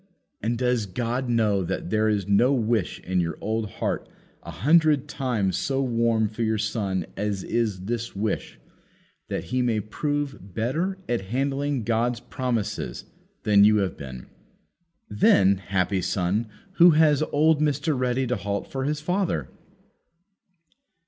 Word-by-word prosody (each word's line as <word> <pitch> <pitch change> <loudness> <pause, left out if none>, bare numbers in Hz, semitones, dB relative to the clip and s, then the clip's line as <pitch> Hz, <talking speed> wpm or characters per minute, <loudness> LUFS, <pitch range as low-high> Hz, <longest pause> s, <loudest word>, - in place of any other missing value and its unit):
And 115 +3 -1
does 125 -3 0
God 120 +5 -2
know 105 -5 +2
that 85 - -4
there 110 0 +2
is 100 -3 0
no 100 +6 +4
wish 115 -6 0
in 95 0 -1
your 85 -1 -3
old 110 -1 -2
heart - - -3 0.3
a - - -11
hundred 150 - +3
times 120 -10 -1
so 135 -1 -1
warm 115 -3 +1
for 110 +3 -7
your 110 -1 +1
son 100 -4 -1
as 100 -2 -2
is 110 -6 -1
this 115 +3 -4
wish, 105 - -3 0.7
that - - -2
he 130 - +2
may 120 -3 +1
prove 140 - -4
better 160 - -1
at 120 -5 -1
handling 135 +3 -1
God's 115 +2 0
promises 125 -5 -3 0.4
than 100 -1 +5
you 105 +1 +6
have 100 -4 0
been? 65 -3 -8 0.8
Then, 100 -2 +4
happy 95 0 -1
son, 95 +6 -1 0.3
who 175 +1 +8
has 155 -3 +4
old 155 +1 +3
Mr. 150 +1 +1
Ready 125 0 0
to 125 0 0
halt 100 0 -4
for 135 -1 -2
his 150 +1 -1
father! 175 - -1
115 Hz, 145 wpm, -25 LUFS, 100-135 Hz, 0.8 s, who